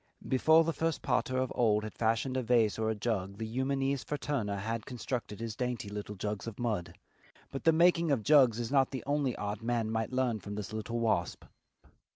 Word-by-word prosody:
Before 160 +5 +5
the 165 0 -1
first 165 0 -1
potter 130 0 0
of 130 -1 0
old 105 -3 +2
had 110 - -6
fashioned 115 +3 0
a 130 - +1
vase 115 -3 +2
or 110 0 +1
a 110 - 0
jug 100 -3 -2
the 110 - -4
Eumenes 135 +3 -1
fraterna 135 -9 -2
had 110 +3 -3
constructed 120 -3 -4
his 115 -1 -4
dainty 125 -3 -3
little 105 0 -6
jugs 105 +2 -4
of 115 - -6
mud. 110 -8 -2 0.6
But 135 - -6
the 165 - +7
making 170 0 +4
of 135 -7 +1
jugs 130 -4 +5
is 120 0 -3
not 135 -2 +4
the 130 - -5
only 145 -3 0
art 105 +2 -4
man 115 -1 -1
might 110 +1 -1
learn 130 -4 0
from 100 +2 -7
this 105 -2 -5
little 115 +2 -3
wasp. 115 -1 0
115 Hz, 200 wpm, -31 LUFS, 110-135 Hz, 0.6 s, the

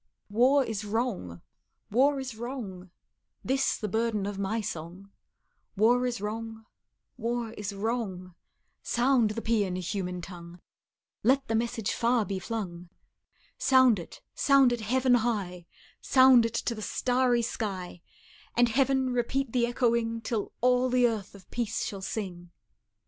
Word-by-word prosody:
War 260 +6 +4
is 220 -3 -4
wrong 205 - -3 0.5
war 275 +5 +3
is 265 -2 -5
wrong; 220 -7 -6 0.5
This 270 +1 +1
the 215 - -3
burden 220 -1 0
of 200 -1 -4
my 200 +3 -1
song: 185 0 -7 0.7
War 245 +4 +4
is 240 -2 -3
wrong 220 +2 -5 0.5
war 235 -1 -2
is 210 -2 -5
wrong 200 -4 -3 0.5
Sound 245 -2 +2
the 225 +2 -4
pean, 205 -5 +1
human 180 0 -3
tongue; 175 0 -10 0.6
Let 265 +3 +2
the - - -1
message 225 -2 -1
far 235 -1 +2
be 195 0 -3
flung 180 -5 -5 0.7
Sound 260 -6 +5
it, 170 - -11
sound 275 -3 +4
it 240 - -3
heaven 255 +4 +2
high, 200 -7 -1 0.3
Sound 260 -3 +6
it 230 - -8
to 235 - -1
the 215 - -7
starry 245 +1 +1
sky, 190 -7 -4 0.6
And 240 0 +5
Heaven, 265 +1 +2
repeat 245 +1 -1
the 240 -2 +2
echoing, 235 -2 0
Till 220 -2 -3
all 250 +1 +3
the 250 0 +3
earth 220 -5 -2
of 190 -2 -15
peace 225 -2 -2
shall 195 -2 -5
sing. 185 -4 -5
225 Hz, 140 wpm, -28 LUFS, 200-245 Hz, 0.7 s, Sound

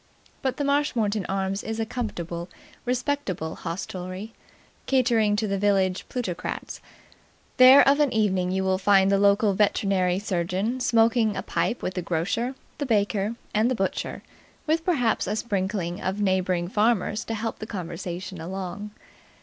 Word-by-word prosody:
But 260 -2 -1
the 290 - -1
Marshmoreton 235 -8 +1
Arms 195 +1 -2
is 225 0 -4
a 225 - 0
comfortable, 175 -8 -4 0.4
respectable 250 - -2
hostelry, 185 +4 -6 0.5
catering 235 -5 +3
for 220 - 0
the 200 -1 -1
village 190 -2 +1
plutocrats. 210 -9 -4 0.8
There 255 +2 +9
of 280 +2 +5
an 290 -3 +3
evening 190 -5 +1
you 190 +1 0
will 190 0 +1
find 195 0 +4
the 195 - +3
local 200 +1 +4
veterinary 190 -2 +2
surgeon 190 +5 -1
smoking 230 -2 +3
a - - -3
pipe 240 - -1
with 185 - -2
the 180 - -2
grocer, 195 +10 -1 0.2
the 285 - -1
baker, 210 -1 +1 0.2
and 215 +3 +3
the 255 - 0
butcher, 195 -3 -3 0.4
with 320 +1 +1
perhaps 250 - +1
a 205 - -1
sprinkling 190 -5 -2
of 190 +2 -2
neighbouring 185 -3 +1
farmers 210 +1 +1
to 225 - -3
help 225 +1 -4
the 215 - -6
conversation 175 -2 -6
along. 190 +3 -5
205 Hz, 150 wpm, -25 LUFS, 185-230 Hz, 0.8 s, There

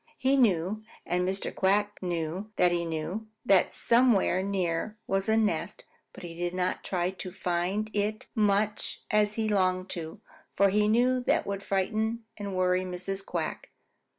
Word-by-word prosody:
He 265 +1 +2
knew, 210 -4 +2 0.2
and 180 +1 0
Mr. 195 +1 -3
Quack 205 +2 +1
knew 175 +3 -3
that 180 -1 +4
he 170 -1 0
knew, 165 +7 -4 0.2
that 195 -2 +4
somewhere 235 -6 +3
near 190 +1 -1
was 195 +2 0
a 220 - +4
nest, 215 -1 -1 0.3
but - - -12
he 170 -1 -7
did 175 +1 -3
not 180 0 -1
try 180 -1 -1
to 185 -1 -7
find 190 +3 -1
it 210 +1 -1
much 210 0 0
as 210 0 +2
he 220 -1 0
longed 185 -2 +1
to, 165 +4 -6 0.4
for 200 0 +5
he 210 +2 +2
knew 245 +4 +3
that - - +2
would 200 -1 -3
frighten 220 +4 -1
and 200 -2 -5
worry 185 0 +2
Mrs. 185 +1 -4
Quack. - - -4
195 Hz, 160 wpm, -28 LUFS, 180-215 Hz, 0.4 s, for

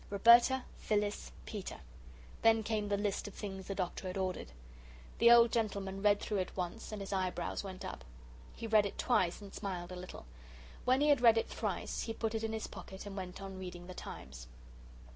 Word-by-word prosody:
"Roberta. 235 +5 +6 0.2
"Phyllis. 210 -1 -1
"Peter." 205 -4 -6 0.6
Then 225 -1 +5
came 215 -1 -1
the 200 - +2
list 205 0 -1
of 205 - -9
things 190 -3 -6
the 195 - -3
Doctor 185 0 -3
had 185 +1 -4
ordered. 185 - -2 0.7
The 235 - +7
old 235 -1 +8
gentleman 200 -4 -1
read 205 0 +5
it - - -10
through 200 -3 0
once, 180 +5 -4
and 215 - -5
his 195 +1 -4
eyebrows 185 -2 -1
went 190 -2 -7
up. - - -6 0.5
He - - -6
read 215 -2 +4
it - - -9
twice 185 -7 +2
and 200 -1 -10
smiled 180 -3 -4
a - - -5
little. 180 - -8 0.6
When 255 +2 +4
he 300 - +4
had 285 -4 +5
read 230 -2 +7
it 225 - 0
thrice, - - -3
he 225 - -3
put 225 0 -1
it 225 0 -2
in 220 - -1
his 220 0 -3
pocket 190 +1 -9
and 200 -1 -7
went 185 0 -6
on 195 -1 -7
reading 180 -1 -7
The 185 - -8
Times. 60 - -9
200 Hz, 200 wpm, -34 LUFS, 185-225 Hz, 0.7 s, old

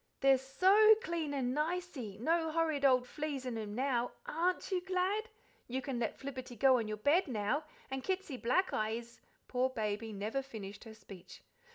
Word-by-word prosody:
"They'se 270 -1 +5
SO 390 +11 +6
clean 335 -7 -2
and 260 -3 -1
nicey 300 - -3
no 320 +7 +1
horrid 315 -3 0
ole 255 -2 +6
fleas 280 +1 -4
'n 250 - -2
them 215 -2 -5
now. 245 -1 0
AREN't 365 -5 0
you 365 -1 +1
glad? 380 +4 0 0.4
You 255 +2 -2
can 265 -2 -3
let 230 - -2
Flibberty 260 -2 -7
go 260 +2 +5
on 225 - -2
your 215 0 -3
bed 310 - +3
now, 245 +5 -1 0.3
and 265 -1 -3
Kitsy 380 -6 -2
Blackeye 230 - +1
is 235 0 -11
" - - -39
Poor 255 +1 +1
Baby 220 -2 -3
never 215 +6 -2
finished 210 -5 -9
her 220 -1 -10
speech. 190 -4 -13
265 Hz, 180 wpm, -34 LUFS, 230-330 Hz, 0.4 s, SO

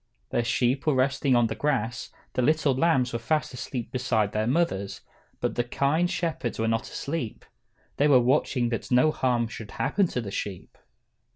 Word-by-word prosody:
The 120 - +1
sheep 125 +4 0
were 150 - +4
resting 135 0 +2
on 120 -1 +4
the 110 - -1
grass, 120 -4 -1 0.2
the - - 0
little 150 +1 +3
lambs 130 -4 +2
were 115 - -1
fast 150 +4 -1
asleep 125 -1 -5
beside 115 -5 0
their 110 +1 -1
mothers, 120 - 0 0.4
but - - -1
the 120 - 0
kind 145 +8 +1
shepherds 165 -9 -2
were 115 - 0
not 115 0 -1
asleep. 140 -7 -4 0.5
They 145 - +4
were 135 -4 +6
watching 125 -1 +2
that 115 - -3
no 125 +5 +4
harm 120 -5 +1
should 110 -2 -8
happen 185 - +1
to 125 - -3
the 105 -5 -5
sheep. 100 -2 -5
125 Hz, 180 wpm, -26 LUFS, 115-145 Hz, 0.5 s, were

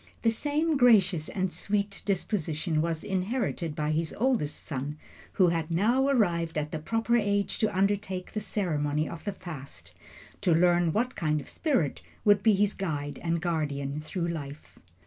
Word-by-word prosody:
The 225 - +4
same 300 +6 0
gracious 195 - +4
and 185 -2 -1
sweet 200 +1 -2
disposition 170 -5 -1
was 165 -1 -2
inherited 190 - -2
by 150 0 -1
his 160 +1 -1
eldest 235 - 0
son, 145 +1 -4 0.4
who 185 -3 +4
had 165 -1 -1
now 230 +11 +2
arrived 170 - +1
at 150 0 -2
the 160 - -3
proper 225 +8 +1
age 205 -2 0
to 215 -4 0
undertake 195 -2 0
the 215 - -1
ceremony 155 -8 -1
of 170 - -8
the 205 - -2
fast 140 - -10 0.5
to 180 -5 +3
learn 175 0 +4
what 245 +8 0
kind 155 -3 0
of 140 - -9
a - - -10
spirit 260 - 0 0.2
would 205 -1 +5
be 220 +1 +5
his 205 +1 +2
guide 145 -6 -3
and 170 -1 -1
guardian 145 -4 -1
through 170 +2 -3
life. 145 -3 -7
175 Hz, 165 wpm, -28 LUFS, 155-210 Hz, 0.5 s, would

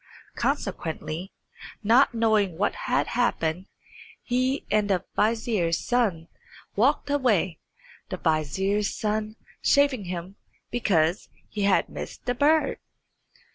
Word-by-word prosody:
Consequently, 165 +3 -3 0.5
not 240 +4 +4
knowing 215 -6 +2
what 205 +3 +1
had 250 - 0
happened, 185 -7 0 0.6
he 255 +2 0
and 210 -1 +2
the 185 -3 +1
vizier's 215 -6 +1
son 205 -10 0 0.5
walked 285 - +2
away, 215 - +1 0.5
the - - -3
vizier's 190 +6 0
son 215 0 -2 0.3
chaffing 280 -7 +3
him 180 +2 -6 0.3
because 185 -6 +1 0.2
he 205 -2 -2
had 200 - +3
missed - - -8
the 245 - +1
bird. 300 +5 +2
210 Hz, 105 wpm, -26 LUFS, 180-245 Hz, 0.6 s, not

